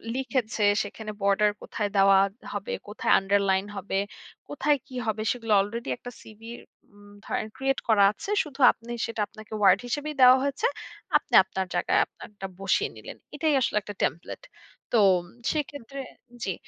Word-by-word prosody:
লিখেছে 255 -5 -1 0.2
সেখানে 215 +1 -7
বর্ডার 200 +1 +3
কোথায় 210 -2 -3
দেওয়া 195 0 +6 0.2
ত - - -26
হবে? 205 -1 -4
কোথায় 210 - 0
আন্ডারলাইন 195 0 +1
হবে? 195 0 -3 0.5
কোথায় 290 0 +1
কি 255 - -11
হবে 220 -1 -1
সেগুলা 230 -3 -1
অলরেডি 215 - -5
একটা 245 - -9
CV 215 0 -15 0.5
উম 205 0 -17 0.2
ধরেন 215 - -2
create 270 0 0
করা 210 -3 +5
আছে, 390 - -9
শুধু 290 -2 -12
আপনি 230 +1 -16 0.2
সেটা 230 -2 -4
আপনাকে 215 +1 -13
WORD 190 -2 +6
হিসেবেই 295 +4 -3
দেওয়া 255 +1 +9
হয়েছে, 280 - -1 0.5
আপনি - - -14
আপনার 190 0 -3
জায়গায় 175 - +2
আপানারটা 200 -3 -10
বসিয়ে 195 -1 +1
নিলেন। - - -10 0.2
এটাই 310 +1 +1
আসলে 210 - 0
একটা 205 +1 -8
template 170 - -3 0.5
তো 235 - +3 0.5
সেক্ষেত্রে 280 -3 -5 0.4
জি, 190 - -1
215 Hz, 155 wpm, -26 LUFS, 200-260 Hz, 0.5 s, দেওয়া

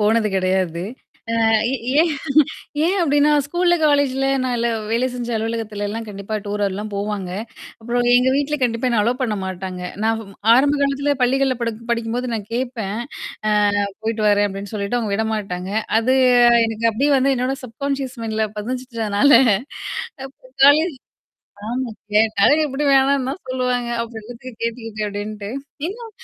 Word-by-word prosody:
போனது 215 +1 +3
கிடையாது. 185 -2 0 0.6
அ - - +4 0.5
ஏன் 335 0 +1 0.7
ஏன் 370 - +2
அப்டின்னா 290 -2 +3 0.2
ஸ்கூல்ல, 350 +3 +2
காலேஜ்ல, 275 -2 +2 0.2
நான் 250 -1 0
எல்ல 235 0 +1 0.2
வேலை 240 +3 +2
செஞ்ச 240 -1 -4
அலுவலகத்துலல்லாம் 220 -1 -3
கண்டிப்பா 200 +1 -4
டூர்லாம் 205 0 -2
போவாங்க. 200 -2 -3 0.5
அப்புறம் 240 +2 0
எங்க 250 +1 +4
வீட்ல 290 +1 0
கண்டிப்பா 235 +1 0
என்ன 230 -3 +2
அலோ 240 +3 +1
பண்ண 215 -4 -1
மாட்டாங்க. 185 -1 -5 0.2
நான் 225 0 +2
வ் 200 -2 -12 0.2
ஆரம்ப 280 +4 +4
காலத்தில 280 +1 +1
பள்ளிகள்ல 265 0 +2
படு 230 -1 -1 0.2
படிக்கும்போது 235 +1 -2
நான் 210 -2 -6
கேட்பேன். 235 -5 -3 0.9
அ - - -3 0.2
போயிட்டு 220 -1 -1
வரேன் 205 0 +3
அப்டின்னு 195 +1 -7
சொல்லிட்டு 205 +3 -1
அவங்க 215 -3 -2
விடமாட்டாங்க. 200 -4 -2 0.3
அது 250 +3 +2 0.5
எனக்கு 225 +1 0
அப்டியே 280 +7 +2
வந்து 270 +1 +2
என்னோட 255 +2 0
சப்கான்ஷியஸ் 265 +2 -4
மைன்ட்ல 220 -1 -1
பதி்ஞ்சிட்டுதுனால, 235 +1 0 0.9
அப்ப 270 - -17 0.3
காலேஜ் 305 +2 +4 0.7
ஆமா. 245 +1 -2 0.2
கேட்டாலும் 220 +7 +4
எப்டியும் 285 0 0
வேணான்னு 270 0 +3
தான் 275 - -3
சொல்லுவாங்க. 250 -2 -1
அப்ப 230 - -7
எதுக்கு 240 +3 -10
கேட்டுக்கிட்டு 225 -2 -4
அப்டின்ட்டு. 205 0 -5 0.4
இன்னும் 455 +5 -7
230 Hz, 140 wpm, -20 LUFS, 210-265 Hz, 0.9 s, அ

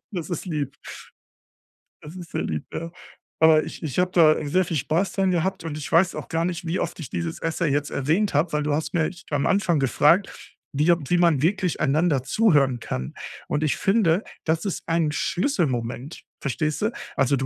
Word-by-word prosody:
Das 180 -5 -5
ist 175 - -4
lieb. 150 -6 -3 1.3
Das 155 +4 -10
ist 175 -3 -9
sehr - - -2
lieb, 75 -1 -3
ja. 165 +1 -5 0.5
Aber 160 -1 +6
ich - - -9
ich 150 -2 -2
habe 180 0 +2
da 155 -4 +4
sehr 185 +5 +2
viel 160 - -2
Spaß 165 +8 0
dran 190 -1 +1
gehabt 185 +1 -1
und 160 -2 -5
ich 150 - -6
weiß 170 +3 +4
auch - - -6
gar 165 0 -1
nicht, 175 -1 -3
wie 170 +3 -1
oft - - -3
ich 150 - -7
dieses 85 -1 -4
Essay 165 0 -1
jetzt 145 +1 -1
erwähnt 165 +10 0
habe, 150 +5 +2
weil 150 - +1
du 150 0 0
hast 155 +2 -2
mich 175 +2 -1
am 145 -2 0
Anfang 180 -6 +2
gefragt, 150 - +1 0.2
wie 150 +5 +3 0.2
wie 175 - +2
man 170 -6 +3
wirklich 180 -1 +1
einander 145 -2 +2
zuhören 140 - +3
kann. 65 - -5 0.3
Und 150 - -1
ich 155 - +1
finde, 195 -3 +2 0.2
das 160 +3 0
ist 195 - -3
ein 165 -2 +1
Schlüsselmoment, 145 - -1 0.2
verstehst 150 +4 -2
du? 215 - +1 0.2
Also, 135 0 +2
du 135 0 -2
160 Hz, 195 wpm, -24 LUFS, 145-180 Hz, 1.3 s, Aber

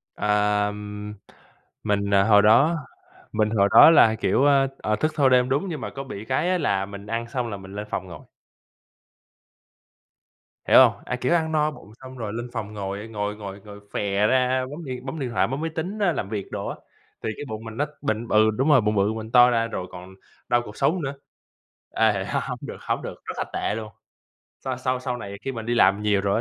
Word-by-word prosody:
Ờm, 105 0 -1 0.7
mình, 100 -1 0
à, 100 0 +5
hồi 105 -1 +6
đó, 120 +11 +5 0.6
mình 110 0 +1
hồi 100 -2 +3
đó - - +9
là, 115 -9 +6
kiểu, 110 +4 +1
ơ, 140 -1 +4
ờ, 105 - 0
thức 155 +7 0
thâu 140 -3 +4
đêm, 125 0 +3
đúng, 145 +8 0
nhưng 155 - -5
mà - - -4
có 135 - -4
bị 110 -6 -8
cái 140 +9 0
á 185 - +2
là 100 - 0
mình 100 0 -10
ăn 115 +2 -3
xong 120 -1 -3
là 100 - -5
mình 95 0 -11
lên 105 +1 -5
phòng 95 -2 -3
ngồi. 90 - -10 2.5
Hiểu - - +6
hông? - - -13
À, - - -2
kiểu, - - 0
ăn 160 -2 +1
no 155 -1 +1
bụng 105 -8 -14
xong 130 0 -10
rồi 110 -3 -5
lên 120 +2 -5
phòng 105 -3 -5
ngồi, 100 -1 -4
a, - - -8
ngồi 105 -1 -3
ngồi 100 -2 -8
ngồi 105 0 -12
phè 100 +1 +1
ra, 130 +1 +2
bấm 155 +2 -8
điện 125 -1 -6
bấm 145 +4 -5
điện 130 - -3
thoại, 115 - +1
bấm 135 +4 -4
máy 165 - -2
tính 185 +7 -4
á, 200 -4 +3
làm 100 -8 -4
việc 105 -3 -5
đồ - - -4
á, - - -4 0.5
thì - - -1
cái 145 - -7
bụng 110 -1 -6
mình 115 0 -9
nó 145 - +1 0.2
bịnh 110 +2 -2
b - - -10
ừ, 110 0 +5
đúng 130 +8 0
rồi, 135 -5 +6
bụng 105 0 0
bự, 100 +2 +2
mình 110 0 -7
to 125 0 +7
ra, 115 -1 +1
rồi 95 -5 -5
còn 90 +1 -11 0.3
đau 120 0 +3
cột 105 -3 -11
sống 160 +7 +1
nữa. 140 -1 -3 0.8
À, 105 -4 +2
h - - -1
hổng - - -4
được - - -7
hổng - - -2
được, - - -8
rất - - -5
là - - 0
tệ - - -1
luôn. 110 -1 -6 0.7
Sau 130 -1 -3
sau 130 0 -1
sau 125 -1 -3
này 100 -4 -7
khi 135 - -3
mình 115 -2 -6
đi 120 - 0
làm 105 -2 +4
nhiều 105 -2 +2
rồi 100 0 0
110 Hz, 235 wpm, -24 LUFS, 105-130 Hz, 2.5 s, đó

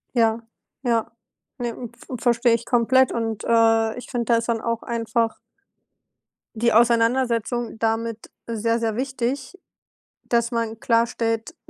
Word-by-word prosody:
Ja, 225 -1 +3 0.4
ja. 230 -2 +1 0.5
Ne, 240 -1 -1
m 235 0 -8
v 245 +2 -8
verstehe 235 -1 +3
ich 230 - -2
komplett 255 +2 +3
und, 225 -2 -2
äh, 225 -1 +3
ich 245 - -9
finde, 240 -3 -2
das 235 0 +4
ist 230 - -7
dann 230 -1 0
auch 230 0 -2
einfach 230 -1 -1 1.2
die 235 +1 +2
Auseinandersetzung 235 0 +2
damit 225 0 -2 0.2
sehr, 230 0 0
sehr 225 -2 -1
wichtig, 265 +5 -3 0.7
dass 235 0 0
man 230 -1 -2
klarstellt, 230 +4 0
230 Hz, 135 wpm, -23 LUFS, 225-240 Hz, 1.2 s, das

